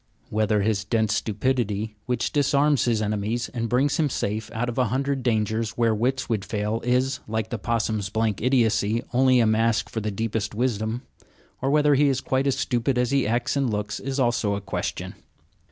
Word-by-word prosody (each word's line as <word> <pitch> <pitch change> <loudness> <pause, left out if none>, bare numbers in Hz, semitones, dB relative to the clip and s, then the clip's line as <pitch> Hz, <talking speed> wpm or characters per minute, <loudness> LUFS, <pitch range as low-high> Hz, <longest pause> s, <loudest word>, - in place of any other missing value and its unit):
Whether 105 -1 +1
his 105 -2 0
dense 110 0 +1
stupidity, 110 -1 -1
Which 125 -2 -1
disarms 145 0 +2
his 115 -3 +1
enemies 105 +3 -2
and 115 -1 -3
brings 135 +4 +2
him 155 -3 +2
safe 110 -3 -2
out 115 +2 -2
of 120 +1 -3
a 125 - +4
hundred 135 +4 -1
dangers 110 -2 0
where 115 -2 +3
wits 125 +5 0
would 110 -4 -1
fail, 105 +2 -2
is, 130 +2 +1
like 110 0 -2
the 120 - -3
possum's 110 -2 -1
blank 110 -1 -1
idiocy, 115 -3 +2
only 130 0 +4
a 115 - +4
mask 110 +1 +1
for 110 - -3
the 105 - -2
deepest 105 0 -2
wisdom; 115 0 -1 0.6
or 135 - 0
whether 150 0 +4
he 140 +1 +4
is 130 -1 +1
quite 130 +1 0
as 135 -1 +1
stupid 125 -1 0
as 125 0 +1
he 135 -5 +2
acts 120 +4 0
and 135 -3 +1
looks, 105 -1 -3
is 135 +1 -3
also 120 -5 +1
a - - -3
question. 100 - -4
115 Hz, 190 wpm, -24 LUFS, 110-130 Hz, 0.6 s, a